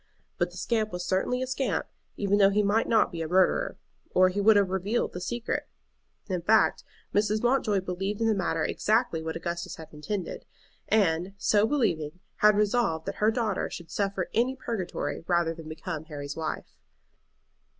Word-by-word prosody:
But -, -, +1 dB
the -, -, -12 dB
scamp 220 Hz, -2 st, 0 dB
was 180 Hz, 0 st, -4 dB
certainly 195 Hz, +8 st, 0 dB
a -, -, -1 dB
scamp, 260 Hz, +1 st, -1 dB, 0.3 s
even 205 Hz, 0 st, +2 dB
though 195 Hz, -1 st, +7 dB
he 210 Hz, +1 st, +2 dB
might 210 Hz, +3 st, +2 dB
not 225 Hz, -2 st, +3 dB
be 170 Hz, -, -5 dB
a 160 Hz, -, -2 dB
murderer, 190 Hz, -, +2 dB, 0.3 s
or 185 Hz, 0 st, +4 dB
he 200 Hz, +2 st, -1 dB
would 215 Hz, +1 st, +6 dB
have 200 Hz, -2 st, +3 dB
revealed 195 Hz, +5 st, -1 dB
the 180 Hz, -, -5 dB
secret. 240 Hz, +5 st, -3 dB, 0.6 s
In 185 Hz, -4 st, -2 dB
fact, 215 Hz, +5 st, +3 dB, 0.3 s
Mrs. 210 Hz, +1 st, +1 dB
Mountjoy 240 Hz, -6 st, +2 dB
believed 195 Hz, +3 st, -3 dB
in 225 Hz, -, +1 dB
the 225 Hz, -, +4 dB
matter 190 Hz, -4 st, 0 dB
exactly 220 Hz, -6 st, +1 dB
what 160 Hz, 0 st, -4 dB
Augustus 170 Hz, +1 st, -4 dB
had 160 Hz, -, -11 dB
intended, 180 Hz, +5 st, -4 dB, 0.4 s
and, 185 Hz, -2 st, +2 dB
so 210 Hz, +2 st, +3 dB
believing, 180 Hz, -, 0 dB, 0.2 s
had 210 Hz, 0 st, +5 dB
resolved 210 Hz, -6 st, +1 dB
that -, -, -4 dB
her 215 Hz, -, +5 dB
daughter 220 Hz, -4 st, -1 dB
should 170 Hz, -2 st, -9 dB
suffer 195 Hz, -2 st, -1 dB
any 245 Hz, +4 st, +2 dB
purgatory 185 Hz, -, -4 dB
rather 170 Hz, -2 st, +2 dB
than 160 Hz, -1 st, -10 dB
become 155 Hz, 0 st, -5 dB
Harry's 145 Hz, -2 st, -6 dB
wife. 160 Hz, -1 st, -5 dB
195 Hz, 175 wpm, -28 LUFS, 170-220 Hz, 0.6 s, though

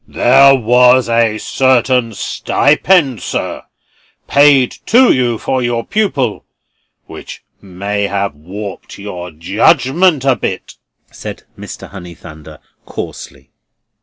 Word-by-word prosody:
"There 135 Hz, +2 st, +4 dB
was 125 Hz, +1 st, +3 dB
a 115 Hz, -2 st, +1 dB
certain 125 Hz, -1 st, 0 dB
stipend, 145 Hz, -, +1 dB
sir, -, -, -5 dB, 0.6 s
paid 140 Hz, -3 st, +4 dB, 0.2 s
to 245 Hz, +4 st, +5 dB
you 120 Hz, -3 st, 0 dB
for 130 Hz, +4 st, -2 dB
your 120 Hz, -1 st, -2 dB
pupil, 140 Hz, -, -1 dB, 0.6 s
which -, -, -11 dB, 0.2 s
may 100 Hz, +2 st, -4 dB
have 100 Hz, -3 st, -2 dB
warped 95 Hz, +7 st, -9 dB
your 90 Hz, -3 st, -8 dB
judgment 130 Hz, -, +1 dB
a 135 Hz, -2 st, +3 dB
bit," 95 Hz, -, -5 dB, 0.4 s
said -, -, -9 dB
Mr. -, -, -10 dB
Honeythunder, 85 Hz, -4 st, -12 dB, 0.3 s
coarsely. 65 Hz, -1 st, -9 dB
120 Hz, 105 wpm, -14 LUFS, 100-135 Hz, 0.6 s, to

